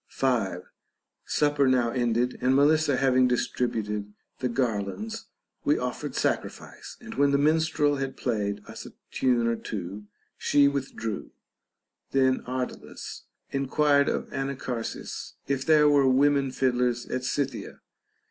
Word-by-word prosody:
5. 110 -9 0 0.6
Supper 145 -2 +2
now 125 -2 +3
ended, 120 0 0
and 130 +1 +3
Melissa 145 0 +4
having 130 -1 +4
distributed 105 -4 -1 0.3
the 125 - -1
garlands, 125 - -2 0.4
we - - +3
offered - - -4
sacrifice; - - -3
and 230 -1 -8
when 140 -6 +3
the 140 - +3
minstrel 155 0 +2
had 135 0 -4
played 105 -4 -2
us - - -9
a - - -13 0.2
tune 125 -3 +2
or 115 0 +1
two, 100 -2 -6 0.3
she 145 -1 +4
withdrew. 135 -6 -3 0.8
Then 130 -1 +3
Ardalus 125 0 -5 0.3
enquired 140 +1 +2
of - - -1
Anacharsis, 135 -3 -4
if 135 -1 0
there 150 -1 +5
were 145 -2 +5
women 140 +1 +3
fiddlers 125 -2 0
at 130 0 -3
Scythia. 130 -1 -3
130 Hz, 125 wpm, -27 LUFS, 120-140 Hz, 0.8 s, there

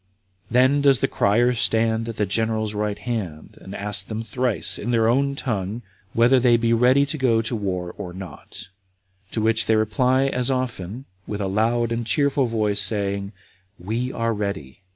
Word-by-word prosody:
Then 130 +4 +3
does 140 -2 +5
the - - 0
crier 120 +5 +2
stand 115 -1 +1
at 115 - -6
the 105 - +1
general's 110 +1 -1
right 105 -1 -2
hand, 100 -11 -5
and 95 - -9
asks 100 -1 -1
them 110 +3 -5
thrice, 115 -3 0
in 110 - -4
their 115 -2 +2
own 140 +4 +2
tongue, 110 -3 -3 0.3
whether 120 +3 +4
they 120 -1 +4
be 115 0 0
now 115 - +2
ready 130 +3 +4
to 145 +2 -5
go 125 -4 +3
out 115 - -1
to 120 - -2
war 90 -4 -3
or 90 - -5
not? 95 +1 -9 0.6
To 110 - -1
which 110 0 +2
they 110 - +4
reply 125 +4 +2
as 125 -2 -1
often, 125 -3 -3 0.2
with 105 - -4
a 100 - -1
loud 115 +4 0
and 115 0 -1
cheerful 140 +3 +2
voice, 105 -3 +1
saying, 100 0 -1 0.5
"We 115 +8 -3
are 115 0 -1
ready." 100 -8 -5
115 Hz, 185 wpm, -23 LUFS, 100-125 Hz, 0.6 s, does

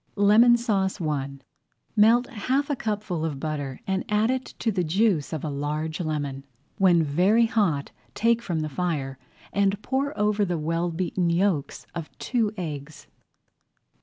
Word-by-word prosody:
LEMON 220 +4 +6
SAUCE 205 -5 0
I 150 -5 -1 0.7
Melt 230 +3 +5
half 265 +5 -1
a - - +1
cupful 210 -8 -3
of 150 -4 -3
butter 145 -3 -4
and 190 0 -1
add 210 +2 +2 0.2
to 230 - -3
it 210 - -2
the 180 - +1
juice 180 -2 +1
of 160 -3 -4
a 155 - -2
large 150 +3 -3
lemon. 145 -4 -3 0.4
When 175 -4 +5
very 185 +10 +3
hot 195 -11 0 0.2
take 230 +1 +2
from 170 -8 -2
the 155 - -2
fire 140 -4 -2 0.3
and 200 0 +2
pour 275 +3 -1
over 210 0 +2
the 175 -3 -1
well 165 +3 -1
beaten 175 +1 -1
yolks 170 -4 0
of 165 -3 -5
two 230 -5 0
eggs. 145 -3 -6
180 Hz, 155 wpm, -25 LUFS, 155-210 Hz, 0.7 s, LEMON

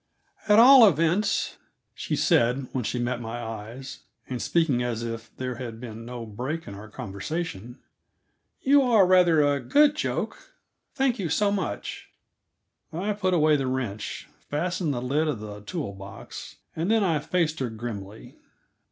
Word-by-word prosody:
"At 210 0 +6
all 245 0 +9
events," 175 +4 +1 0.4
she - - -3
said 125 +3 +2
when 130 - -2
she 110 - -2
met 120 0 -2
my 115 +1 -5
eyes, 115 +3 -7 0.3
and 125 -2 -4
speaking 160 -8 +1
as 120 -2 -2
if 115 0 -5
there 125 -2 -4
had 115 -3 -6
been 115 -2 -8
no 120 -1 -6
break 130 +10 -5
in 100 - -7
our 105 +2 -10
conversation, 115 - -5 0.9
"you 280 +1 +6
are 230 -7 +5
rather 180 -4 +5
a 145 -1 +2
good 295 - +4
joke. - - -4 0.4
Thank 265 -3 +1
you 175 -4 -2
so 200 +6 +2
much." 190 - -4 0.8
I 195 +6 -2
put 185 -3 0
away 155 -2 +4
the 135 -2 -1
wrench, 120 -6 -4 0.2
fastened 175 +2 -1
the 120 -3 -3
lid 145 +5 +1
of 145 -8 -2
the 105 -1 -8
tool 140 - -5
box, 100 0 -10 0.2
and 165 +4 -1
then 225 -1 +3
I 165 -5 +2
faced 160 +1 0
her 130 -3 -1
grimly. 110 -2 -8
135 Hz, 160 wpm, -26 LUFS, 115-180 Hz, 0.9 s, all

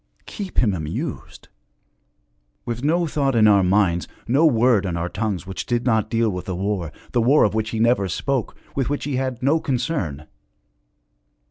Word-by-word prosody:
Keep 200 -4 -7
him 110 -5 +3
amused! 80 -3 -5 1.2
With 120 +1 -4
no 170 +4 +2
thought 140 -4 0
in 110 -2 +5
our 100 -2 +5
minds, 90 -2 +2 0.2
no 140 +7 +4
word 120 -5 +3
on 90 -3 -2
our 85 +1 -2
tongues 100 -4 -3
which 95 0 -6
did 120 0 0
not 110 -3 +1
deal 115 -2 +1
with 90 -1 -5
the 95 - -3
war, 95 -3 -2 0.2
the 120 - +2
war 135 +6 +5
of 105 - +2
which 110 0 -1
he 110 - -3
never 115 -4 +3
spoke, 130 +6 -2 0.2
with 135 -3 -1
which 145 - -2
he 140 -3 -2
had 130 -1 -3
no 150 +5 +3
concern! 120 - -2
115 Hz, 175 wpm, -22 LUFS, 95-135 Hz, 1.2 s, in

